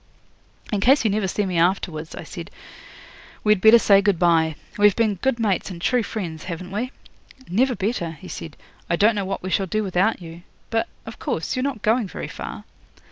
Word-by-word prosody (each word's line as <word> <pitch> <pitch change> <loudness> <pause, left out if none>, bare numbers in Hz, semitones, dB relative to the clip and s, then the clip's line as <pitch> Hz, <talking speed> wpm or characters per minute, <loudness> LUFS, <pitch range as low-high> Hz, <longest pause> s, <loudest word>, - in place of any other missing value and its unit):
'"In 205 - +1
case 265 +8 +4
you 215 - +3
never 205 -1 0
see 205 +2 -1
me 180 -3 0
afterwards," 165 -3 0
I - - -7
said, - - -8 0.9
"we'd 210 -3 +3
better 220 +2 +9
say 200 -3 +5
good 200 -3 +2
bye. 165 -2 +3 0.2
We've 205 -1 +6
been 225 -2 +2
good 265 -3 +1
mates 205 -5 0
and 180 -3 -7
true 245 +7 +2
friends, 175 -8 -5
haven't 180 +1 -6
we?" 235 +6 -2 0.6
'"Never 245 +7 +2
better," 190 -5 -2
he 175 +4 -12
said. 160 -4 -8 0.3
"I - - +3
don't 210 +6 +4
know 200 -2 -2
what 195 - -4
we 185 - -4
shall 195 0 +1
do 215 +4 -1
without 195 +3 +1
you. 170 -1 -10 0.3
But, 225 0 +1 0.2
of 225 - -9
course, 165 - -2
you're 255 - -1
not 260 -5 -3
going 225 0 +2
very - - -6
far?" - - -7
200 Hz, 200 wpm, -23 LUFS, 175-220 Hz, 0.9 s, better